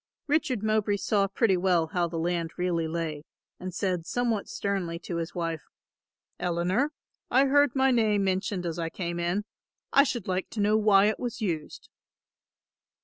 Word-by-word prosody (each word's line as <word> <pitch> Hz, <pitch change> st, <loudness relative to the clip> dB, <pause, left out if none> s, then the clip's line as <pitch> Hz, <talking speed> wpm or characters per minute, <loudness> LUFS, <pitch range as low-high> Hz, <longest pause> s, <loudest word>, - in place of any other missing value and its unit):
Richard 280 Hz, -7 st, 0 dB
Mowbray 215 Hz, -1 st, +1 dB
saw 200 Hz, 0 st, +1 dB
pretty 195 Hz, 0 st, +2 dB
well 180 Hz, -2 st, +2 dB
how 175 Hz, -1 st, +1 dB
the 165 Hz, 0 st, -5 dB
land 170 Hz, 0 st, -1 dB
really 175 Hz, -2 st, 0 dB
lay 160 Hz, -2 st, -3 dB, 0.4 s
and 185 Hz, 0 st, -5 dB
said 180 Hz, -1 st, -1 dB
somewhat 235 Hz, -4 st, 0 dB
sternly 190 Hz, -4 st, -2 dB
to 170 Hz, 0 st, -5 dB
his 165 Hz, 0 st, -4 dB
wife, 165 Hz, -2 st, -2 dB, 0.8 s
"Eleanor, 180 Hz, -, 0 dB, 0.4 s
I 265 Hz, +3 st, +4 dB
heard 285 Hz, -1 st, +4 dB
my 265 Hz, 0 st, +4 dB
name 215 Hz, -4 st, +2 dB
mentioned 190 Hz, -1 st, -1 dB
as 170 Hz, 0 st, -3 dB
I 165 Hz, -1 st, -2 dB
came 175 Hz, -1 st, -4 dB
in, 175 Hz, +4 st, -1 dB, 0.5 s
I 275 Hz, -, +8 dB
should 240 Hz, -7 st, -3 dB
like 185 Hz, 0 st, -1 dB
to 220 Hz, -, -6 dB
know 210 Hz, +1 st, +3 dB
why 205 Hz, -2 st, +5 dB
it 215 Hz, -, +1 dB
was 245 Hz, -2 st, -4 dB
used." 165 Hz, -8 st, -4 dB
190 Hz, 165 wpm, -28 LUFS, 170-215 Hz, 0.8 s, I